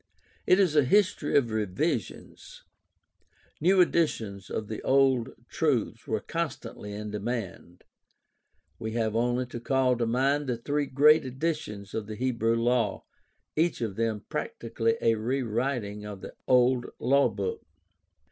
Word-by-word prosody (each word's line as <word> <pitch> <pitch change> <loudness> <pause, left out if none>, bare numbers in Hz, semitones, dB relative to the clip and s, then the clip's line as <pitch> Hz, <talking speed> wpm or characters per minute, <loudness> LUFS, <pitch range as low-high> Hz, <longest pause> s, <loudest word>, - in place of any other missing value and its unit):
It 185 - +5
is 180 -6 +3
a 150 - +6
history 185 0 +2
of 120 -5 +2
revisions. 110 - -3 1.0
New 185 +3 +5
editions 110 - 0
of 110 - -3
the 110 - -5
old 130 -3 +3 0.2
truths - - -1
were - - 0
constantly 150 -10 -5
in 105 +1 -6
demand. 105 -5 -5 1.0
We 110 0 -4
have 110 -2 -1
only 120 +2 +1
to 120 -1 -7
call 130 +1 +2
to 115 - +1
mind 135 +5 +1
the 125 -2 -1
three 145 +4 -1
great 150 +4 +5
editions 130 -7 -4
of 110 -2 -3
the 110 - -6
Hebrew 115 -1 0
law, 115 -2 +1 0.5
each 165 +2 +1
of 110 -5 -3
them 110 -2 -2
prac - - -4
tically 115 0 -1
a 115 - +4
rewriting 115 -2 -2
of 105 -2 -8
the - - -8
old 125 0 +3
lawbook. 140 - +1
120 Hz, 140 wpm, -28 LUFS, 110-140 Hz, 1.0 s, a